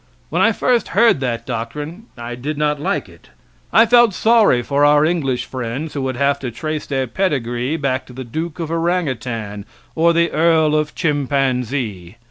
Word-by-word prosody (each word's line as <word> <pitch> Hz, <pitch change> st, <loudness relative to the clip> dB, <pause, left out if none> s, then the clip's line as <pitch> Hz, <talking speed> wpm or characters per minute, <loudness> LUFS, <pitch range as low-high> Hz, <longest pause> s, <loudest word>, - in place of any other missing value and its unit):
When -, -, +1 dB
I -, -, +5 dB
first 245 Hz, -2 st, +1 dB
heard 230 Hz, -, +5 dB
that 125 Hz, -3 st, -3 dB
doctrine 145 Hz, -, -5 dB
I 120 Hz, 0 st, -6 dB
did 140 Hz, +5 st, -5 dB
not 150 Hz, -1 st, 0 dB
like -, -, -1 dB
it. -, -, -19 dB, 0.4 s
I 225 Hz, -, +6 dB
felt 240 Hz, -3 st, +5 dB
sorry 220 Hz, -, +4 dB
for 140 Hz, +3 st, +1 dB
our 145 Hz, +1 st, +5 dB
English 145 Hz, -7 st, -1 dB
friends, 130 Hz, +5 st, -5 dB
who 140 Hz, -, -3 dB
would 130 Hz, -1 st, -2 dB
have 140 Hz, +1 st, +1 dB
to 130 Hz, -, -4 dB
trace 155 Hz, +6 st, -4 dB
their 135 Hz, -2 st, -1 dB
pedigree 130 Hz, -3 st, -1 dB
back 135 Hz, -3 st, -2 dB
to 125 Hz, -, -12 dB
the 130 Hz, +1 st, -6 dB
Duke 155 Hz, +7 st, -5 dB
of 165 Hz, -1 st, -4 dB
Orangutan, 130 Hz, -, -2 dB, 0.3 s
or 165 Hz, +1 st, +3 dB
the 170 Hz, 0 st, +2 dB
Earl 160 Hz, -1 st, +3 dB
of 155 Hz, -1 st, -1 dB
Chimpanzee. 130 Hz, -, -1 dB
145 Hz, 175 wpm, -19 LUFS, 125-165 Hz, 0.4 s, I